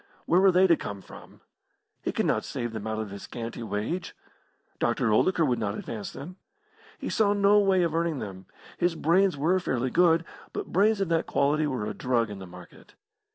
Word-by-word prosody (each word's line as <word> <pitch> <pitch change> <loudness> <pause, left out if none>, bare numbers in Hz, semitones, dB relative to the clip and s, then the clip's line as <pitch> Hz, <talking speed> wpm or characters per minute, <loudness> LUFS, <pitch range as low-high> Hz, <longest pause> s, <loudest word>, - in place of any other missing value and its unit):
Where 180 +2 +4
were 195 -1 +6
they 185 +1 +5
to 170 -3 +5
come 100 -9 -7
from? - - -14 0.6
He - - -2
could - - -1
not - - +1
save 120 -1 -4
them 110 -1 -5
out 110 0 -2
of 110 -2 -4
his 100 - -8
scanty 115 0 -6
wage. 115 - -3 0.6
Dr. 110 - +1
Oldacre 165 - +3
would 125 -4 0
not 105 -1 -2
advance 110 -3 -6
them. 175 +7 -9 0.6
He - - -6
saw 205 -2 +2
no 205 0 +4
way 190 -3 +3
of 165 -2 0
earning 165 -2 0
them. 95 -5 -7 0.3
His 175 -1 +1
brains 175 +2 +2
were 170 +6 +2
fairly 130 -7 -1
good, 165 -1 +4 0.3
but - - -3
brains 205 +2 +3
of 195 - 0
that 165 -1 +1
quality 150 +2 +1
were 130 -7 -2
a 105 - -3
drug 120 -4 0
in 100 - -7
the 95 - -9
market. 90 0 -14
150 Hz, 200 wpm, -27 LUFS, 110-180 Hz, 0.6 s, were